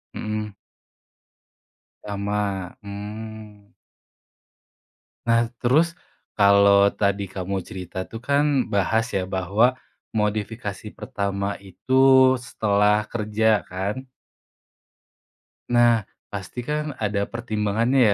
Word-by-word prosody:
Mhm. 105 -1 -4 1.5
Sama. 100 -2 -2
Mmm. 105 0 -9 1.5
Nah 115 0 +3
terus 160 +9 +2 0.4
kalo 100 -1 +6 0.2
tadi 100 -1 0
kamu 95 0 -4
cerita 90 -1 -8
tuh 115 - -9
kan 140 +1 +3 0.3
bahas 105 +3 +2
ya 95 - -1
bahwa 95 +6 +2 0.4
modifikasi 105 -1 -2
pertama 100 0 -3
itu 95 +8 -6 0.5
setelah 105 -3 +2
kerja 110 -3 +1
kan. 100 +8 -3 1.6
Nah, 120 -3 +4 0.2
pasti 100 +4 -6
kan 150 +3 -3
ada 100 -1 0
pertimbangannya 115 +1 +1
105 Hz, 85 wpm, -23 LUFS, 100-115 Hz, 1.6 s, kalo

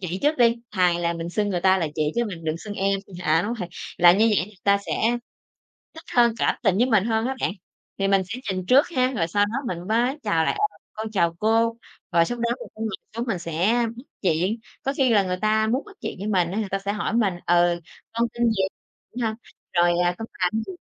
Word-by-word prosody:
chị 185 0 -3
trước 300 0 +2
đi, 235 -1 +5
thà 180 -4 +3
là 170 0 0
mình 170 0 -5
xưng 205 +2 0
người 180 -3 -1
ta 190 +1 +4
là 165 - 0
chị 155 -1 0
chứ 235 0 +1
mình 170 -6 -7
đừng 155 0 -1
xưng 205 +3 -7
em 195 0 0 0.2
à, 160 +2 +3
đúng 230 +3 -2
rồi. 180 -6 -5 0.3
Làm 175 +2 +7
như 225 - +5
vậy 180 - +1
người 210 -2 -17
ta 200 0 +4
sẽ - - -2 1.0
thích 320 - -11
hơn, 235 -2 +5
cảm - - +2
tình 195 -5 +3
với 240 +5 +3
mình 215 -5 +3
hơn 225 0 0
á 265 - -1
bạn, - - 0 0.5
thì 195 - +1
mình 195 -1 +4
sẽ 225 +7 -6
nhìn 185 -1 -3
trước 265 +7 +5
ha, 255 -6 +1
rồi 165 -5 +1
sau 205 +4 +2
đó 205 - -6 0.2
mình 175 +2 -9
mới 245 +6 +1
chào 160 -1 +1
lại: - - +1 0.2
"Ờ, - - -22 0.2
con 220 0 -5
chào 170 -5 +1
cô." 225 +2 +2 0.4
Rồi 170 -1 +5
xong 240 +6 -4
đó 235 - +1
người - - -9
ta - - -20
ngồi 225 - -1 0.3
xuống 235 - -1
mình 215 -6 -1
sẽ 175 +8 +1
bắt 240 - -9 0.2
chuyện. 185 +5 +1 0.2
Có 275 - 0
khi 260 -3 +3
là 210 -3 +5
người 185 -1 -2
ta 215 0 +2
muốn 250 +5 0
bắt 420 -2 -15
chuyện - - -4
với 200 - -5
mình 180 -5 +2
á, 200 - -2
người 205 - -3
ta 195 - -1
sẽ 200 +1 -3
hỏi 210 +2 -2
mình: 215 -5 +2
"Ừ, 175 0 +3 0.3
con 235 +1 +1
tên 235 -1 +2
gì?" 205 -4 +1 0.5
Đúng 245 - -3
hông? 220 - -1 0.4
Rồi, 175 -1 +3
à: 175 - +1
"Con 225 - -5 0.2
làm 215 +5 +1
gì?" - - -6
205 Hz, 255 wpm, -24 LUFS, 175-230 Hz, 1.0 s, Làm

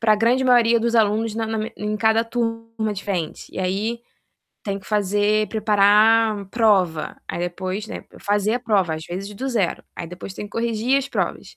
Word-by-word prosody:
pra 215 -2 +4
grande 235 +4 +2
maioria 235 -2 +4
dos 235 +1 0
alunos 220 0 +2
na 225 0 -2
na 220 0 -2 0.2
em 210 0 -3
cada 220 +1 +3
turma 230 -2 -3
diferente 190 -5 -4
e - - -7
aí, 200 +6 -1 0.6
tem 200 -1 -3
que 190 - -18
fazer 210 +1 +1
preparar 215 0 +4
prova, 195 -9 +2
aí - - -4
depois, 185 +4 -3
né, - - -7 0.2
fazer 205 +2 +1
a 250 - -2
prova, 195 -8 +1
às 160 0 -7
vezes, 195 +4 -5
do 265 +6 -4
zero, 215 -9 0
aí 170 - -6
depois 180 +2 -8
tem - - -6
que 205 - -10
corrigir 230 +4 +1
as 275 0 -4
provas. - - -3
215 Hz, 180 wpm, -22 LUFS, 200-230 Hz, 0.6 s, pra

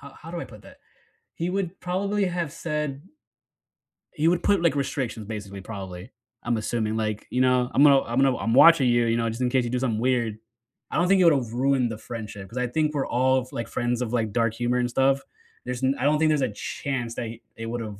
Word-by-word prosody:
how 140 - -11
how 165 - -11
do 170 0 -4
I - - -4
put - - -14
that? - - -16 0.6
He 170 +2 -2
would 190 -1 -3
probably 200 +3 -1
have 175 -4 -2
said 150 -3 -3 1.1
he 155 -1 +1
would 175 +1 +2
put, 200 -4 +3
like, 170 -4 +2
restrictions, 130 -5 -3
basically, 100 -3 -6
probably, 95 -2 -8 0.3
I'm 120 -1 0
assuming, 110 0 -1
l - - 0
ike, 110 -1 -3
you 125 - 0
know, 125 -1 +3
"I'm 140 - +5
gonna 140 -2 +7
I'm 120 +2 -4
gonna 135 -2 +3
I'm 115 - -1
watching 145 -1 +7
you, 120 0 +3
you 115 0 +2
know, 115 0 0
just 115 +3 -5
in 125 - +2
case 130 -1 +1
you - - -3
do 125 +1 -1
something 115 -4 -1
weird." 120 -3 0 0.5
I - - -4
don't 175 - +3
think 190 0 +4
it - - +5
would 165 - +7
have 120 -5 -2
ruined 130 -1 +1
the 110 - -5
friendship 110 -4 -7
because 105 +6 -11
I 125 - +1
think 150 +4 0
we're 140 - 0
all, 130 +1 +2
f 125 - -14
like, 115 -1 -4
friends 120 +1 -1
of, 120 -2 -2
like, 110 -3 0
dark 115 -2 +1
humor 120 +1 0
and 120 0 0
stuff. 135 +2 +2 0.4
There's 125 +1 -4
n 130 - +3
I - - -2
don't 150 +1 +4
think 160 0 +3
there's 150 -2 +2
a 130 -4 0
chance 120 +1 -4
that - - -3
he 115 +1 -9 0.2
it 115 0 -5
would 120 +1 -3
have 105 -3 -7
125 Hz, 255 wpm, -25 LUFS, 115-145 Hz, 1.1 s, gonna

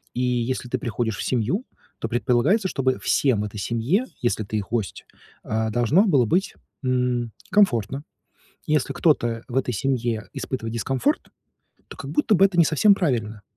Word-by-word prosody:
И 125 - -1
если 125 0 -1
ты 130 +1 -2
приходишь 115 -2 -2
в - - -3
семью, 130 - 0 0.4
то - - -2
предполагается, 125 - +2
чтобы 130 -6 0
всем 120 -7 +2
этой 105 0 -6
семье, 120 - 0 0.2
если 120 -2 0
ты 110 +2 -3
их 100 - -4
гость, 110 -5 -3 0.4
а, 110 0 -1
должно 120 - +3
было 140 -10 +4
быть, 185 - 0 0.3
м, 125 -2 0 0.2
комфортно. 135 - +2 0.6
Если 150 -2 +1
кто-то 120 -8 +1
в 130 - -3
этой 125 -2 0
семье 120 -1 -1
испытывает 115 -4 -4
дискомфорт, 135 - 0 0.6
то - - -11
как - - -6
будто 295 -8 +2
бы 190 +2 +6
это 190 -3 -5
не 170 - +7
совсем 180 +7 +4
правильно. 115 - -1
125 Hz, 165 wpm, -23 LUFS, 115-155 Hz, 0.6 s, не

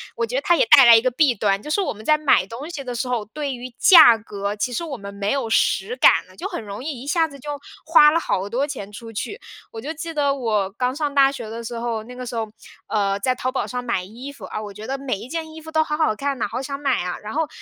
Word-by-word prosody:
我 230 - -1
觉 235 +2 -6
得 270 - +1
它 345 +4 +3
也 - - +3
带 270 -3 +8
来 235 -1 +9
一 225 - +5
个 255 - +1
弊 270 0 +3
端， 200 -2 0
就 300 - -9
是 395 +7 +1
我 370 - -2
们 215 +1 -13
在 305 +3 +4
买 295 -10 +3
东 245 - -8
西 315 -5 -6
的 250 -2 -5
时 245 +2 -3
候， 240 -4 -2
对 280 +5 -4
于 250 +1 -7
价 315 - +8
格， 205 -1 -5
其 215 +4 -2
实 335 - -2
我 305 -5 -5
们 200 -2 -8
没 200 0 -2
有 270 -5 -1
实 220 +1 +1
感 - - +5
呢， 185 - -19
就 - - -5
很 - - -6
容 205 +3 -7
易 280 -5 -5
一 275 - -10
下 325 +1 +2
子 280 -2 -13
就 295 - -9 0.4
花 305 -2 +7
了 330 - +2
好 195 - -2
多 265 +6 -1
钱 205 -8 -7
出 225 +2 -10
去。 410 - -5 0.3
我 225 - -8
就 295 - -5
记 330 +1 -6
得 285 -2 +1
我 215 -7 0
刚 250 +4 -2
上 295 -2 -2
大 275 0 +5
学 240 -5 -7
的 230 +1 -6
时 235 +1 -6
候， 230 -2 -3
那 250 +3 -11
个 250 - -7
时 245 0 -6
候， 225 -1 -2 0.4
呃， 200 -2 0
在 255 +5 +1
淘 255 +1 -2
宝 270 - -2
上 250 0 -5
买 235 -7 -1
衣 240 +9 -9
服， 280 - -11
啊， 215 - -5
我 210 -1 -7
觉 210 +2 -9
得 270 - -3
每 265 -7 -3
一 230 - -9
件 320 0 -4
衣 320 - -9
服 320 0 -10
都 315 0 +3
好 300 -1 -3
好 305 -9 +1
看 275 +2 -2
呐， 225 - -1
好 250 - -4
想 275 +1 -5
买 275 -7 0
啊。 180 0 -4
然 215 - -6
后， 320 +1 0
250 Hz, 320 characters per minute, -22 LUFS, 220-290 Hz, 0.4 s, 来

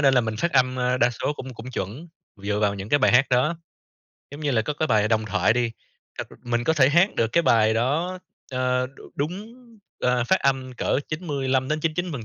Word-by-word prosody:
nên 135 -2 +4
là 125 - +5
mình 110 -1 -3
phát 170 +10 -1
âm, 130 -1 +2
à, 125 0 +1
đa 120 +1 +4
số 120 +5 -2
cũng 130 -3 -8
cũng 120 +3 -9
chuẩn 125 - -5 0.3
dựa 105 0 -1
vào 100 -1 +2
những 100 +1 -7
cái 145 - +3
bài 130 - +3
hát 130 +3 +5
đó, 140 +7 +2 0.7
giống 145 +2 -9
như 145 - -1
là, 110 -4 +2
có 150 - -2
cái 155 - -1
bài 110 0 +3
"Đồng 110 -1 +1
Thoại" 95 +1 +2
đi, 120 0 0 0.5
ơ, - - -2 0.2
mình 120 0 -1
có 160 - +3
thể 140 -4 +4
hát 175 +7 +3
được 115 - +2
cái 170 - +3
bài 110 -5 +3
đó, 155 +11 0 0.3
ờ, 125 0 0 0.3
đúng, 185 +10 -4 0.5
ờ, 125 -1 +1
phát 190 +10 +2
âm 130 -2 0
cỡ 125 - 0
95-99%, 155 +2 -1
130 Hz, 210 wpm, -24 LUFS, 115-150 Hz, 0.7 s, là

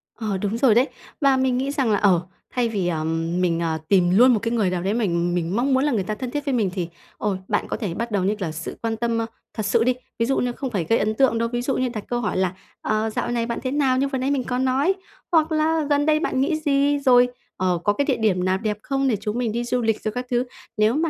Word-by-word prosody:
Ờ, 215 -4 -2
đúng 205 +3 -2
rồi 235 -3 +4
đấy. 255 +5 +4 0.3
Và 275 -2 +4
mình 260 -1 +1
nghĩ 270 +2 -1
rằng 270 -5 +1
là, 205 - +3
ờ, 185 -5 +4 0.3
thay 245 -2 0
vì, 195 -5 -1
ờ, 160 -3 -1 0.4
mình, 170 -2 +1
ờ, 165 -2 -1
tìm 180 -3 +4
luôn 250 +1 +7
một 220 - +2
cái 230 +2 -2
người 220 -5 +1
nào 180 -1 -2
đấy 195 +3 0
mình 175 -6 0
mình 175 +3 -1
mong 265 +3 +1
muốn 260 - +3
là 295 - +2
người 215 -6 0
ta 215 +3 -3
thân 250 +1 -5
thiết 290 0 -3
với 280 - 0
mình, 220 -6 +1
thì, 180 -4 -2 0.3
ôi, 205 -3 -1
bạn 210 - 0
có - - -3
thể 200 -8 -3
bắt 235 +3 -4
đầu 195 -3 +1
như 205 +3 +1
kiểu 195 - -4
là - - -4
sự 160 +1 -6
quan 225 -1 -2
tâm, 235 0 0
ơ, 225 - 0 0.3
thật 215 - -3
sự 225 +2 +3
đi. 250 +1 +3 0.3
Ví 230 - +3
dụ 270 +3 +1
như 250 - 0
không 265 +2 -4
phải 200 -7 -1
gây 230 - +4
ấn 215 +1 +1
tượng 255 -2 +3
đâu, 230 0 0
ví 240 0 -2
dụ 265 +2 -1
như 255 -1 0
đặt 215 -4 -5
câu 240 - -1
hỏi 210 - -1
là 185 -1 +1 0.3
"Ờ, 215 +1 0
dạo 240 +2 -2
này 235 -1 0
bạn 235 0 -3
thế 255 - -1
nào?", 270 -3 +2
như 275 +2 +2
vừa 275 -1 -2
nãy 265 +2 0
mình 265 -3 0
có 250 - -2
nói, 265 +8 +2 0.4
hoặc 320 -1 +3
là 315 +1 +2
"Gần 290 0 +2
đây 310 0 +3
bạn 310 -6 0
nghĩ 310 +4 +1
gì?", 285 -1 +2
rồi, 250 -3 +5 0.3
ờ, 180 -2 +1
"Có 205 - +3
cái 285 +5 0
địa 265 -5 +1
điểm 195 -5 +1
nào 185 0 +2
đẹp 210 0 -2
không 275 0 0
để 245 - +2
chúng 210 +3 -3
mình 240 -3 0
đi 235 +2 -2
du 245 +1 -1
lịch?", 225 -1 0
rồi 215 - -2
các 250 +3 -4
thứ. 245 0 +1 0.3
Nếu 215 +2 +3
mà 325 +2 +1
235 Hz, 300 wpm, -23 LUFS, 205-265 Hz, 0.4 s, luôn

